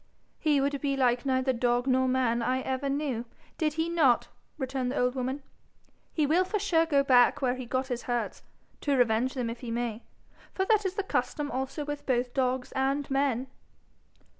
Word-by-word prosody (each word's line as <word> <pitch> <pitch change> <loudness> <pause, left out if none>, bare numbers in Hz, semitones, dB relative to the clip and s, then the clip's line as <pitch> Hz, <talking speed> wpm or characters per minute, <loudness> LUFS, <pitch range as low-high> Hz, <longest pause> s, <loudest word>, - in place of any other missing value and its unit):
'He 300 -3 +3
would 280 0 0
be 275 -1 0
like 250 0 +2
neither 260 0 +2
dog 245 0 +1
nor 260 -1 +3
man 250 -2 +1
I 255 +3 0
ever 265 +2 -2
knew, 275 -4 -1 0.4
did 310 -3 +1
he 320 +1 -1
not.' 315 -8 +3 0.3
returned 260 -2 -2
the 275 - -3
old 250 0 +2
woman. 260 +2 -3 0.7
'He 310 - +1
will 330 +6 +3
for 400 +3 -2
sure 340 -5 +2
go 280 -3 +3
back 250 -3 +5
where 250 -1 +2
he 255 -1 -6
got 255 +2 -1
his 245 -1 -2
hurts 240 -1 -3 0.4
to 285 -2 +1
revenge 245 +2 +2
them 250 -3 -1
if 230 +1 -5
he 245 - -7
may, 235 -1 -2 0.5
for 380 - +1
that 425 -1 +3
is 375 - -5
the 400 - -1
custom 295 -6 -2
also 265 +3 -3
with 290 0 -6
both 245 -1 0
dogs 255 -1 0
and 275 +1 -1
men.' 270 -2 +1
260 Hz, 190 wpm, -28 LUFS, 250-290 Hz, 0.7 s, back